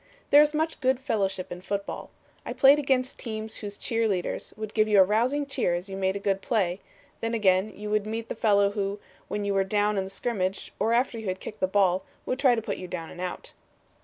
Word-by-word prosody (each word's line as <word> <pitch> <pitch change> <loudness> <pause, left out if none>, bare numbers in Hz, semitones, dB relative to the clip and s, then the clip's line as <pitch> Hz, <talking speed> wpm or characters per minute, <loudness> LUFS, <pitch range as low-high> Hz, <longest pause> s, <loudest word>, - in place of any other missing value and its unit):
"There 290 - +9
is 300 0 +2
much 320 +1 -1
good 260 0 +2
fellowship 195 -8 -1
in 180 - -6
football. 200 +1 -4 0.3
I - - -5
played 275 +2 +6
against 265 -2 0
teams 220 -2 -5
whose 205 -1 -6
cheer 230 -1 0
leaders 185 -4 -2
would 215 -1 -6
give 215 -1 +3
you 210 -2 +5
a - - +10
rousing 240 +9 +1
cheer 225 -10 0
as 180 +3 -5
you 190 - -5
made 190 0 0
a - - -2
good 195 -1 0
play; 190 -6 0 0.4
then 230 0 -1
again 195 -1 +3
you 210 +1 -5
would 215 0 +1
meet 225 +1 -4
the - - -3
fellow 200 -2 +3
who, 200 0 -2 0.3
when 205 0 -3
you 200 - 0
were 195 0 +3
down 205 +1 +1
in - - 0
the 190 - -7
scrimmage, 195 -2 -3
or 220 +3 +1
after 235 0 +1
you 220 - -6
had 185 0 -2
kicked 215 - -8
the 185 - +2
ball, 190 -1 +2 0.2
would 255 - -2
try 260 -4 +5
to 225 - -3
put 205 -3 -3
you 185 - -7
down 170 -2 -6
and 175 - -9
out. 180 -1 -5
210 Hz, 240 wpm, -27 LUFS, 190-230 Hz, 0.4 s, a